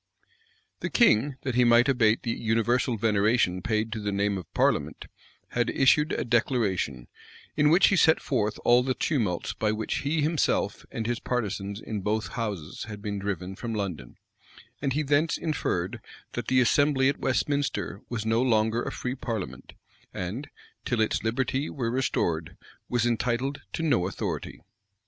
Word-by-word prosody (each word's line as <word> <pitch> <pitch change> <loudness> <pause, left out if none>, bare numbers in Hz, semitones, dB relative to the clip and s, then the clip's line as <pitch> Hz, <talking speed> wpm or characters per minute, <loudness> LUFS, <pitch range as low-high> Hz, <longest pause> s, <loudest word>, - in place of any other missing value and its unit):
The - - -3
king, 145 - +4
that 130 - -2
he 125 +1 +4
might 120 +1 +5
abate 115 -5 +3
the 120 - -1
universal 115 +2 +1
veneration 105 -3 +2
paid 110 +2 -1
to 115 - -3
the 105 -1 -2
name 100 0 0
of 90 -4 -7
parliament, - - +1 0.4
had - - 0
issued 150 +3 +3
a - - -1
declaration, 105 - 0 0.5
in 150 0 +4
which 175 +5 +6
he 200 - +3
set 160 -3 +5
forth 110 -5 -1
all 120 +1 +6
the 130 0 -1
tumults 110 - -1
by 105 -1 0
which 110 0 -2
himself 155 +2 0
and 115 - -4
his 120 0 -1
partisans 100 -4 -3
in 110 -2 -5
both 105 +2 -1
houses 100 -9 -4
had 105 -1 -9
been 100 -2 -3
driven 95 -1 -4
from 115 +2 -4
London; 90 - -5 0.6
and 140 -2 0
he 150 +2 0
thence 150 +3 +2
inferred, 115 - -2 0.3
that 120 -2 -4
the 130 - +3
assembly 135 +2 +3
at 140 - 0
Westminster 140 +2 -1
was 115 -3 -3
no 115 +1 +2
longer 110 -2 +2
a - - -3
free 125 - -3
parliament, 115 -7 -5 0.4
and, 105 +11 -5 0.3
till 125 - -1
its 110 -1 +1
liberty 130 +5 -1
were 120 -5 -2
restored, 85 -11 -1 0.3
was 120 -1 +1
entitled 120 +4 -1
to 165 - -3
no 125 - +2
authority. 95 - -5
115 Hz, 160 wpm, -27 LUFS, 105-130 Hz, 0.6 s, which